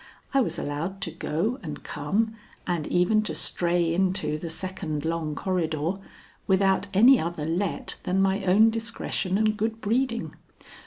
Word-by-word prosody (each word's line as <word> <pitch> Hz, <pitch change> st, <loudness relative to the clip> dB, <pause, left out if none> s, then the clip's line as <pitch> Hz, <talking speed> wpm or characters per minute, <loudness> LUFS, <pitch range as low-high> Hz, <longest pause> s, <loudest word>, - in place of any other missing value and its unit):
I 275 Hz, -, +5 dB
was -, -, -1 dB
allowed 165 Hz, +7 st, -3 dB
to 165 Hz, -, -3 dB
go 170 Hz, -, -2 dB
and 150 Hz, -5 st, -7 dB
come 205 Hz, +10 st, -1 dB, 0.3 s
and 170 Hz, -4 st, -1 dB
even 180 Hz, +5 st, +3 dB
to 215 Hz, -, -3 dB
stray 170 Hz, -1 st, +1 dB
into 175 Hz, -4 st, +1 dB
the 170 Hz, -, -5 dB
second 160 Hz, -3 st, -4 dB
long 160 Hz, -2 st, -2 dB
corridor, 165 Hz, -2 st, -1 dB, 0.5 s
without 195 Hz, 0 st, +3 dB
any 240 Hz, +7 st, +7 dB
other 165 Hz, -2 st, -3 dB
let 170 Hz, +3 st, -2 dB
than 185 Hz, +1 st, 0 dB
my 195 Hz, +1 st, +2 dB
own 205 Hz, +5 st, +5 dB
discretion 225 Hz, -4 st, -2 dB
and 215 Hz, 0 st, +2 dB
good 220 Hz, +1 st, -2 dB
breeding. 230 Hz, +2 st, 0 dB
185 Hz, 150 wpm, -26 LUFS, 165-215 Hz, 0.5 s, any